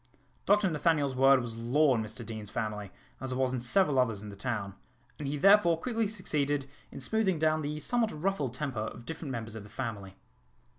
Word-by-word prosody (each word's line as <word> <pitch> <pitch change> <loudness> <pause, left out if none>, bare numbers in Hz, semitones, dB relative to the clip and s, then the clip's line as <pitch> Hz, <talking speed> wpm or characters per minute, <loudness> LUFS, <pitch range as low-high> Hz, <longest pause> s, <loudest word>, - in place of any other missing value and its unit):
Dr 205 0 +4
Nathaniel's 150 -3 +1
word 135 0 +6
was 120 -2 -5
law 130 +5 +3
in 115 - 0
Mr 110 +2 -6
Deane's 110 -2 -6
family, 105 -3 -4 0.3
as 130 -1 -4
it - - -3
was 130 -1 +1
in 130 - -1
several 135 +3 +3
others 115 -5 +1
in 105 - -7
the 100 - -9
town, 100 -2 -3 0.5
and 145 - -4
he 145 +2 -2
therefore 190 -1 +6
quickly 230 +1 0
succeeded 145 -9 -1 0.2
in - - -8
smoothing 190 +5 +1
down 155 0 +2
the 150 +1 -3
somewhat 235 +6 +1
ruffled 150 -6 -2
temper 135 -5 -3
of 110 +2 -5
different 160 0 -6
members 115 -3 -5
of 110 - -6
the 105 - -13
family. 100 -7 -5
135 Hz, 200 wpm, -30 LUFS, 115-160 Hz, 0.5 s, word